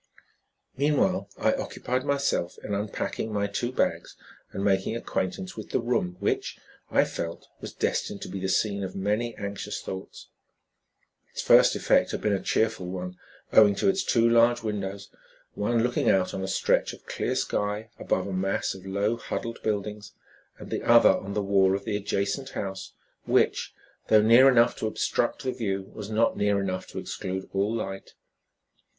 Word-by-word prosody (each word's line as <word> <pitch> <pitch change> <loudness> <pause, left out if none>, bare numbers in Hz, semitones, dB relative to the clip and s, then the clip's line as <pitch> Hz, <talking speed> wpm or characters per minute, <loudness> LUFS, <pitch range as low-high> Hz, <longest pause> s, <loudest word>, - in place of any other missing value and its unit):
Meanwhile 145 +1 +1
I - - +2
occupied 130 +1 -3
myself 140 -11 0
in 105 - -4
unpacking 105 +2 -3
my 100 -1 0
two 100 +4 -2
bags - - -1 0.4
and 100 - -4
making 100 +2 +1
acquaintance 115 - -3
with - - -8
the - - +1
room 115 -7 -1
which, - - -1 0.3
I - - +4
felt, 85 0 -5
was - - -7
destined 100 - -2
to - - -6
be 95 - -5
the 95 0 -2
scene 100 +1 +1
of 95 - -5
many, 105 +4 -1
anxious 100 -1 -5
thoughts. 95 0 -8 1.0
Its - - -4
first - - +6
effect - - +3
had - - -3
been 105 -1 +1
a 95 - 0
cheerful 110 -5 0
one, 90 0 -5 0.4
owing 105 -2 +7
to 195 - +2
its 190 0 +1
two 115 -1 +3
large 115 0 +4
windows, 100 -2 -4 0.4
one 115 +2 +1
looking 125 0 +1
out 95 -1 +2
on 95 - -3
a 95 - -3
stretch - - +1
of - - -14
clear - - -2
sky 105 +2 -2
above 95 - 0
a 100 - -4
mass 95 +1 -1
of 95 0 -11
low, 100 +4 0
huddled 115 0 -5
buildings, 105 0 -3 0.4
and - - -11
the - - -1
other - - +6
on 100 +1 -3
the 105 - 0
wall 95 -1 +3
of 100 - -5
the 105 - -1
adjacent 105 +5 -2
house 95 -1 -5 0.3
which, - - +2 0.4
though 110 - +6
near 120 +5 +7
enough 120 -2 +4
to 110 - -2
obstruct 110 - -1
the 130 - 0
view, 100 -6 -3
was 105 -1 -7
not 110 +1 +2
near 100 -1 +1
enough 95 -1 -3
to - - -10
exclude 95 +1 -4
all 100 +2 +1
light. 95 -3 -5
105 Hz, 175 wpm, -27 LUFS, 95-115 Hz, 1.0 s, owing